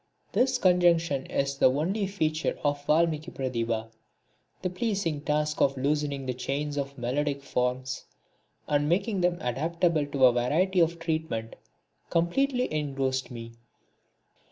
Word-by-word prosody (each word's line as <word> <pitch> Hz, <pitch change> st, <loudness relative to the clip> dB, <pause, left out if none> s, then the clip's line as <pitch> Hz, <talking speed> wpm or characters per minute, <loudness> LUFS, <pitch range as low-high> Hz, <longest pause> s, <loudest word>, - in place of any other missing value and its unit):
This 260 Hz, 0 st, +2 dB
conjunction 170 Hz, -, +3 dB
is 140 Hz, 0 st, -1 dB
the -, -, +6 dB
only 185 Hz, +9 st, 0 dB
special 195 Hz, +1 st, -11 dB
feature 155 Hz, -1 st, 0 dB
of 145 Hz, -1 st, 0 dB
Valmiki 155 Hz, 0 st, +2 dB
Pratibha. 115 Hz, -5 st, -2 dB, 0.7 s
The 185 Hz, -, -1 dB
pleasing 185 Hz, -6 st, -1 dB
task 150 Hz, 0 st, 0 dB
of 135 Hz, 0 st, +3 dB
loosening 140 Hz, 0 st, -1 dB
the 130 Hz, -, -1 dB
chains 140 Hz, +4 st, -3 dB
of 140 Hz, -1 st, -4 dB
melodic 140 Hz, +3 st, -1 dB
forms 130 Hz, 0 st, -2 dB, 0.6 s
and 145 Hz, 0 st, +1 dB
making 195 Hz, +3 st, +1 dB
them 175 Hz, 0 st, +2 dB
adaptable 155 Hz, +4 st, 0 dB
to 140 Hz, -2 st, +3 dB
a 125 Hz, -, +6 dB
variety 165 Hz, +10 st, +2 dB
of 170 Hz, 0 st, +3 dB
treatment 160 Hz, -9 st, -3 dB, 0.5 s
completely 250 Hz, -, +1 dB
engrossed 135 Hz, -3 st, -1 dB
me. 115 Hz, -2 st, -8 dB
150 Hz, 130 wpm, -28 LUFS, 135-170 Hz, 0.7 s, the